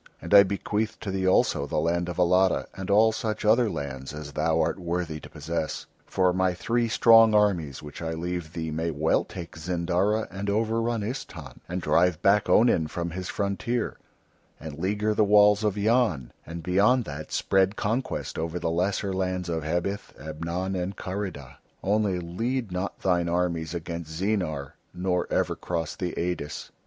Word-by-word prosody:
And - - -4
I 100 - +11
bequeath 105 +2 -1
to 100 - -4
thee 95 -1 -1
also 95 - +2
the - - -3
land 85 +3 0
of 85 - -5
Alatta, 90 +1 +3
and 95 0 -7
all 110 +2 +5
such 110 -1 -3
other 115 +2 +4
lands 70 -4 -5
as 75 -1 -7
thou 80 +2 +1
art - - 0
worthy 85 -3 -3
to - - -12
possess, 80 +1 -4 0.2
for 90 -1 +2
my 95 0 +1
three 115 +6 0
strong 115 -1 +6
armies 90 -11 +1
which 75 +2 -9
I 80 -1 -3
leave 85 -1 -4
thee 80 -2 -4
may 80 +2 -1
well 80 0 +1
take 85 -3 -9
Zindara 90 +6 0
and 95 +1 -4
over 110 +2 +1
run 115 -1 -1
Istahn, 125 +6 -6
and 90 +1 -3
drive 85 0 +3
back 100 +1 +4
Onin 110 -9 +4
from 85 +2 -4
his 90 +1 -5
frontier, 105 +4 -2 0.6
and 80 -1 -8
leaguer 105 +4 0
the 105 - +3
walls 105 0 +5
of 105 -1 0
Yan, 105 - +1 0.2
and 85 +1 -7
beyond 105 +8 +3
that 75 +1 -7
spread 95 +1 +2
conquest 115 +6 -2
over 80 +2 -2
the 85 - -1
lesser 95 +3 0
lands 90 -1 -2
of 80 -2 -2
Hebith, 85 +6 -3
Ebnon, 85 +5 -4
and 90 +2 -3
Karida. 90 -9 -5 0.3
Only 100 -2 +1
lead 115 +7 -3
not 90 +2 -4
thine 90 -2 +1
armies 85 -2 -1
against 85 -1 -5
Zeenar, 90 -9 -1 0.2
nor 90 0 0
ever - - +1
cross 80 -3 -3
the 90 -3 -3
Eidis." 85 -4 -3
90 Hz, 170 wpm, -26 LUFS, 85-105 Hz, 0.6 s, I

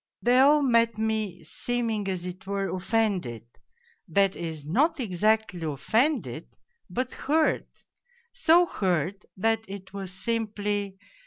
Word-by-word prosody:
They 245 +1 +5
all 290 +2 +6
met 230 -3 +3
me, 220 -5 -2
seeming 225 +4 -2
as 185 -2 -3
it 180 +1 -8
were 195 -1 -2
offended, 185 - -1 0.6
that 195 +3 +2
is, 160 -3 -6
not 295 - +2
exactly 215 -3 +1
offended, 220 - -1 0.3
but 255 +1 -3
hurt 310 +2 +1 0.7
so 345 +2 +5
hurt 185 - -1 0.2
that 225 +3 +1
it 190 -1 -9
was 195 -2 -5
simply. 205 -1 -2
205 Hz, 115 wpm, -27 LUFS, 185-230 Hz, 0.7 s, all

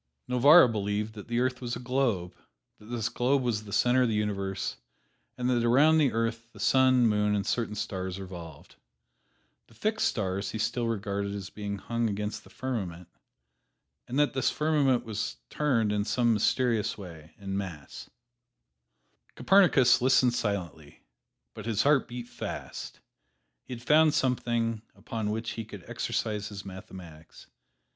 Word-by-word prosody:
Novarra 140 +6 +7
believed 105 -1 -2
that 105 -2 -10
the 120 0 0
earth 130 0 0
was 120 -1 -3
a - - -6
globe; 120 -8 -1 0.5
that 105 - -15
this 115 -1 -2
globe 125 +3 +1
was 110 -3 -1
the 100 - -10
center 125 +4 +3
of 125 - +3
the 110 - 0
universe, 100 -2 -2 0.6
and 125 - -1
that 120 -2 +2
around 145 +7 +5
the 145 -4 +3
earth 115 0 -2
the - - -14
sun, 130 -2 +4
moon 105 -1 +2
and 100 - -1
certain 115 -3 -1
stars 95 -2 -4
revolved. 85 -5 -10 0.9
The 115 - -21
fixed 215 - 0
stars 95 -2 -2
he - - -4
still 120 +2 -1
regarded 100 -2 -2
as 95 -2 -7
being 100 -1 -5
hung 115 +3 -2
against 105 +1 -4
the - - -17
firmament, 95 -10 -5 1.0
and 125 - -3
that 145 0 +3
this 130 - +1
firmament 145 -6 +1
was 110 0 -4
turned 120 -8 +1
in 105 0 0
some 120 +2 +2
mysterious 115 +1 +1
way, 85 -5 -11
en 95 -1 -5
masse. 90 -8 -6 1.3
Copernicus 135 -10 +5
listened 130 -1 +4
silently, 85 -10 -4 0.5
but 105 - -8
his 110 -3 +1
heart 145 -1 +3
beat 120 0 -7
fast. - - -7 0.6
He 125 - -6
had 120 - -12
found 155 +2 +5
something 120 -4 0
upon 105 +1 -4
which 110 +2 -3
he 115 - -5
could 100 -4 -11
exercise 105 -1 -2
his 100 -1 -8
mathematics. 95 -4 -11
115 Hz, 155 wpm, -28 LUFS, 100-125 Hz, 1.3 s, Novarra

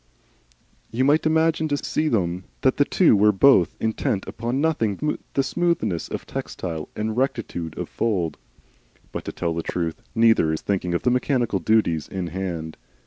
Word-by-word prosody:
You 125 +3 0
might 150 +3 +3
imagine 160 0 +2
to 145 -1 0
see 155 +2 -1
them 90 - 0 0.2
that 130 - +2
the 145 - +4
two 170 - +4
were 105 +1 +5
both 100 -3 +5
intent 110 -3 -1
upon 120 +4 -3
nothing 150 -3 0 0.2
but 135 - +2
smoothness 170 - 0
of - - -5
textile 80 -4 -5
and 110 +1 -2
rectitude 115 - -2
of - - -3
fold. 90 -9 -1 0.7
But - - -5
to - - -4
tell 85 -1 -2
the 85 - -2
truth, 85 -1 -3
neither 115 -8 +4
is 80 - -2
thinking 90 -3 -1
of - - -1
the 125 - +3
mechanical 125 -5 +1
duties 85 -5 +1
in 95 -2 -4
hand. 85 -4 -4
110 Hz, 165 wpm, -23 LUFS, 85-135 Hz, 0.7 s, were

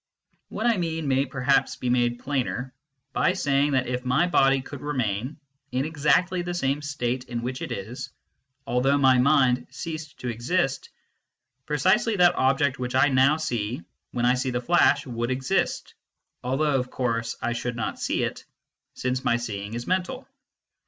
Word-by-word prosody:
What 220 - -4
I 235 -3 +3
mean 165 -3 -2
may 135 +1 +2
perhaps 135 +1 +1
be 125 - -5
made 120 -1 +2
plainer 130 -1 -3 0.4
by 180 - +2
saying 145 -4 +1
that 130 -1 +2
if 125 0 -3
my 130 +7 +2
body 135 -6 +3
could 145 0 -9
remain 130 -2 -2 0.3
in 130 +2 0
exactly 160 +4 +2
the 175 0 -4
same 140 -3 0
state 130 -3 -2
in 120 -1 -4
which 125 +1 -4
it - - -5
is, - - -5 0.6
although 125 +4 +2
my 130 -2 +5
mind 130 -2 +4
had - - -19
ceased 160 -3 -6
to 125 - -4
exist, 135 +4 -1 0.8
precisely 190 - +2
that 180 -2 +5
object 135 0 +1
which 125 0 -3
I 130 +3 +5
now 135 +3 +4
see 120 - -3 0.3
when 120 -1 -1
I 125 - +5
see 130 +1 -1
the 125 -1 -1
flash 145 +2 +3
would 120 -2 -3
exist, 130 0 -1 0.5
although 135 +2 +1
of 125 0 -4
course 115 -3 -2
I 120 - -1
should 120 +1 -3
not 115 - -3
see - - 0
it, - - -4 0.5
since 130 +1 -2
my 120 - +2
seeing 105 -2 -5
is 120 +1 -4
mental. 190 +9 -2
130 Hz, 170 wpm, -25 LUFS, 125-150 Hz, 0.8 s, my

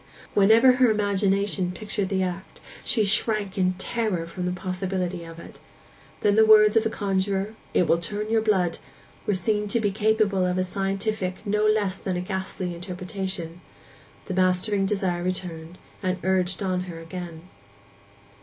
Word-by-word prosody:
Whenever 220 +6 +6
her 255 -2 +5
imagination 200 -3 +1
pictured 205 0 -2
the 190 -1 0
act 185 +1 -5 0.2
she 220 -3 +1
shrank 205 -1 +2
in 185 -1 +2
terror 190 -3 -1
from 180 +2 -5
the - - 0
possibility 185 -1 -3
of 165 0 -10
it: 170 - -12 0.6
then 205 -1 +3
the 220 - +6
words 215 0 +6
of 225 - +5
the 225 - 0
conjuror, 195 0 -1 0.2
'It 180 - +4
will 170 - +3
turn 205 +5 -4
your 225 -1 +3
blood,' 190 -6 +1 0.5
were 205 - +2
seen 210 +3 0
to 235 +3 +1
be 205 -2 0
capable 210 -2 +1
of 180 0 0
a 185 - +2
scientific 195 +1 -2
no 210 +1 +1
less 205 -3 +1
than 185 -2 -3
a - - -2
ghastly 190 -1 -4
interpretation; 180 -1 -5 0.6
the 190 - -4
mastering 185 +2 +1
desire 190 -4 -1
returned, 175 -2 -4 0.2
and 185 -1 -1
urged 185 +1 +1
her - - -1
on 185 -1 -1
again. 170 -1 -8
190 Hz, 160 wpm, -25 LUFS, 180-210 Hz, 0.6 s, Whenever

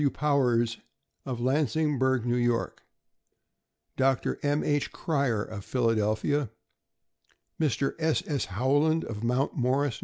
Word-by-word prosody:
W. 145 - +3
Powers, 125 -6 +1 0.5
of 130 -2 -3
Lansingburgh, 130 -1 +1
N. 120 0 +2
Y.; 115 - 0 1.3
Dr. 135 -1 +1
M. 145 +1 +1
H. 145 -1 0
Cryer, 140 -9 0
of 105 -2 -8
Phil 120 0 0
adelphia; 110 +5 0 1.1
Mr. 140 -3 0
S. 160 -1 +1
S. 145 -5 -1
Howland, 145 - +1
of 110 -1 -6
Mount 125 +4 0
Morris, 130 +1 +1
N. - - -13
130 Hz, 125 wpm, -28 LUFS, 120-145 Hz, 1.3 s, W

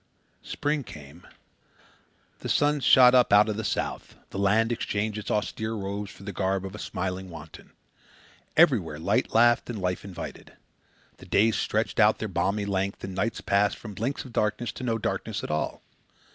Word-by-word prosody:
Spring 145 0 -2
came. 75 - -12 1.1
The - - -6
sun 145 0 +2
shot 125 -2 +7
up 125 -1 +5
out 105 +1 +6
of 105 - -1
the 110 - -4
south. 95 -3 -3 0.2
The 100 - -5
land 110 +4 +3
exchanged 105 -2 -2
its 105 - -7
austere 110 +1 -2
robes 100 0 -4
for 90 - -13
the 100 0 -6
garb 95 0 -1
of 95 - -7
a 105 - -8
smiling 95 -1 -4
wanton. 80 -2 -12 0.8
Everywhere 110 - +4
light 80 - 0
laughed 120 +2 +4
and 115 -3 -4
life 90 -1 -2
invited. 95 -3 -8 0.6
The - - -14
days 110 +2 +3
stretched 110 +1 -1
out 105 0 +5
their 110 - -3
balmy 100 +2 -1
length 100 0 -2
and 95 -1 -5
the 95 - -1
nights 115 - -2
passed 100 +1 +2
from 105 -3 -9
blinks 115 +10 -3
of 125 - -11
darkness 110 +2 0
to - - -9
no 115 -2 0
darkness 110 - -3
at - - -4
all. 75 - -2
105 Hz, 180 wpm, -26 LUFS, 95-115 Hz, 1.1 s, shot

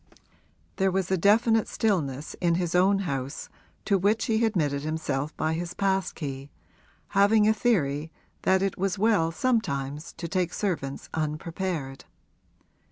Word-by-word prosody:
There 195 -1 +3
was 190 -1 -1
definite 215 +5 +3
stillness 155 - -1
in 170 -2 +3
his 175 -1 -1
own 195 +2 +4
house, 135 -2 -4 0.4
to 200 -2 +2
which 210 +4 +2
he 225 0 +1
admitted 155 -11 +1
himself 155 -1 -3
by 155 0 0
his 170 +1 -4
pass 195 -1 0
key, 140 -2 -6 0.6
having 210 +2 +4
a 220 - +5
theory 160 - 0 0.3
that 190 0 +3
it 195 -2 -2
was 195 +1 0
well 200 -6 +2
sometimes 150 - -1
to 170 +1 -6
take 180 +1 -1
servants 160 -9 -3
unprepared. 155 -2 -3
175 Hz, 135 wpm, -27 LUFS, 150-200 Hz, 0.6 s, a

